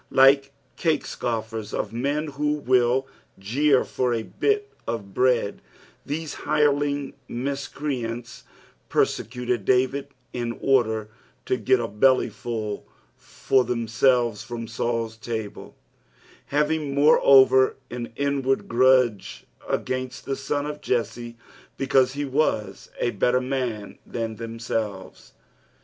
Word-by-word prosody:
Like 135 +1 +5 0.3
cake 160 -3 +1
scoffers, 110 -2 -4
or - - -1
men 140 +6 -1
who 150 +1 -1
will 130 -2 +2 0.3
jeer 130 +8 +2
for 125 -2 0
a 115 - -2
bit 420 - -1
of 100 -4 -4
bread, 125 -4 +1 0.4
these 155 +1 -4
hireling 145 -2 +1
miscreants 125 -2 -4 0.5
persecuted 125 -1 0
David 130 +5 +2 0.3
in 120 -1 -2
order 110 -5 +2 0.4
to - - +1
get 125 +2 +2
a 115 - -2
bellyfull 110 -1 0 0.3
for 130 -1 0
themselves 115 -1 +1
from 120 -3 -6
Saul's 115 0 -2
table; 110 -2 -6 0.7
having 150 0 0
moreover 135 -3 +6 0.2
an 120 -1 -5
inward 140 -1 0
grudge 125 -4 +2 0.2
against 130 0 -3
the 135 - -1
son 145 +1 -2
of 150 0 -5
Jesse 120 0 -2 0.4
because 130 -1 +3
he 145 +1 -2
was 120 -9 -1
a 120 - +1
better 125 +4 +2
man 125 -5 -3
than 115 -2 -4
themselves. 115 -4 -5
125 Hz, 110 wpm, -24 LUFS, 115-140 Hz, 0.7 s, moreover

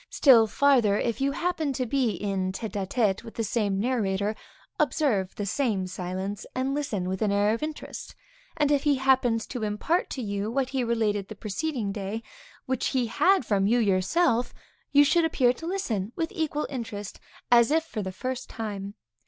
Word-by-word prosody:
Still 235 -6 +6
farther; 240 -5 +3
if 235 +2 -1
you 275 +1 +1
happen 335 -5 -1
to 255 0 -1
be 255 0 +1
in 190 0 -2
tête 215 +3 -5
à 200 -3 -2
tête 205 -3 +1
with 230 - -11
the 225 - -1
same 205 -2 0
narrator, 210 -3 0 0.4
observe 210 - +1
the 205 - -3
same 205 -4 0
silence, 185 +2 -4
and 260 +1 0
listen 230 -11 -2
with 190 0 -3
an 210 -2 +2
air 205 +1 +3
of 230 - -3
interest, 305 0 -6 0.4
and 295 -2 +2
if 285 -2 +3
he 290 -1 +3
happens 255 -4 +2
to 245 - -6
impart 215 - 0
to 260 - -4
you 200 0 -2
what 260 +2 0
he 265 -2 -1
related 215 -4 0
the 215 - -8
preceding 220 +1 -3
day, 205 +3 -4 0.4
which 260 -2 -1
he 255 -2 +1
had 365 - +3
from 200 -2 +2
you 235 +3 +3
yourself, 230 - +2 0.4
you 290 0 +7
should 330 +4 +3
appear 260 -6 +3
to 325 +6 -8
listen 230 - -2
with 325 0 -2
equal 310 -4 -1
interest, 220 -6 -6 0.3
as 235 0 +6
if 320 +2 +2
for 245 -9 -5
the 190 -1 -4
first 255 +7 -5
time. 205 -2 -5
230 Hz, 185 wpm, -27 LUFS, 200-275 Hz, 0.4 s, you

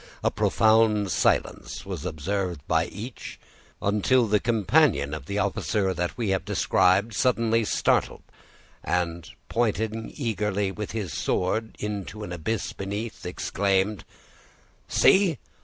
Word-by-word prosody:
A - - +2
profound 110 -3 +3
silence 90 - 0
was 90 -4 -5
observed 90 +1 -3
by 80 +1 +2
each, 110 +7 -8 0.4
until 105 +5 +3
the 105 -1 +2
companion 95 -10 +2
of 75 -3 -6
the 100 - -3
officer 100 -1 0
that 90 0 -3
we 115 -4 -1
have 95 -1 0
described 100 +5 +2
suddenly 115 0 +2
started, - - +1 0.6
and 85 -2 -2 0.2
pointing 110 -1 -1
eagerly 105 -6 -1
with 105 +2 -6
his 105 -7 -3
sword 110 +5 -1
into 105 0 -5
the 90 - -6
abyss 100 +7 -3
beneath, 100 +1 -5
exclaimed,— 95 +2 0 0.8
"See! 190 -6 +4
100 Hz, 120 wpm, -26 LUFS, 95-110 Hz, 0.8 s, See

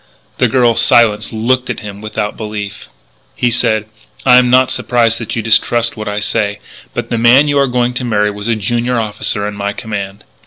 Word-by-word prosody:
The - - +4
girl, 125 -3 +3
silenced, 115 -3 +3
looked 125 +3 0
at 120 - -4
him 100 -1 -9
without 105 -1 -4
belief. 105 -2 -7 0.5
He 120 - 0
said: 110 -2 +1 0.4
"I 125 -1 +7
am 125 -1 +4
not 130 +1 +4
surprised 115 -2 +1
that 115 - -5
you 115 - -2
distrust 115 +1 +2
what 110 -2 -6
I 105 0 -2
say. 105 -1 -1 0.4
But - - -4
the 115 - 0
man 125 +5 +5
you 145 -1 +2
are 140 - +3
going 125 -1 0
to 125 - -3
marry 105 -3 +1
was 105 +1 -7
a 115 - +1
junior 120 +3 -1
officer 105 -1 -2
in 105 - -5
my 100 0 -3
command. 100 -2 -6
115 Hz, 200 wpm, -14 LUFS, 105-120 Hz, 0.5 s, I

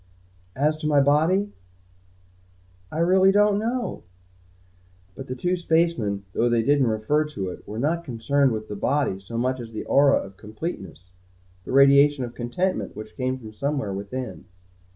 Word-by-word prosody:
As 150 +3 +1
to 155 - -4
my 145 -2 +4
body 160 +9 +2 1.4
I - - -5
really 185 +3 +4
don't 205 0 +3
know." 240 +2 -3 1.1
But 135 +7 -9
the 130 - -4
two 180 +7 0
spacemen, 160 - 0
though 120 - +1
they 120 -1 +2
didn't 140 0 +3
refer 110 +8 +1
to 100 -11 -5
it - - -12
were 105 - -6
not 160 +7 0
concerned 135 +1 +1
with 110 -1 -4
the 105 - -6
body 140 -2 0
so 105 +4 -7
much 130 +2 0
as 115 -2 -9
the 110 - -5
aura 140 0 +4
of 95 0 -7
completeness, 105 - -7 0.5
the - - -6
radiation 140 +1 +5
of 120 -1 -6
contentment 130 +11 -2
which 110 +1 -9
came 130 0 -2
from 110 -4 -11
somewhere 135 -3 -2
within. 100 +3 -6
135 Hz, 160 wpm, -24 LUFS, 110-155 Hz, 1.4 s, radiation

